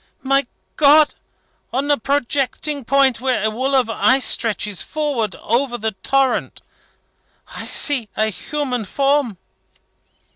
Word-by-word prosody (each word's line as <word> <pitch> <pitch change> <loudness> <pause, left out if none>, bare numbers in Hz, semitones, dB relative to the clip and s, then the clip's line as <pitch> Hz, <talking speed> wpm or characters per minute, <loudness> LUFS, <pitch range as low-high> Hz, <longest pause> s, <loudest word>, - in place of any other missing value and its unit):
"My 275 0 +1 0.3
God! 300 +1 +5 0.6
On 275 +3 0
a - - +5
projecting 280 +2 -2
point, 270 -2 +2
where 255 -5 0
a 220 - +1
wall 260 +5 -1
of 255 -3 +3
ice 260 +3 +2
stretches 210 -4 -1
forward 285 -9 -2
over 240 +2 -1
the 220 -1 -2
torrent, 260 +6 -1 0.9
I - - -6
see 260 -8 +2
a 215 0 +1
human 255 +1 -3
form!" 275 -2 0
265 Hz, 120 wpm, -19 LUFS, 230-280 Hz, 0.9 s, God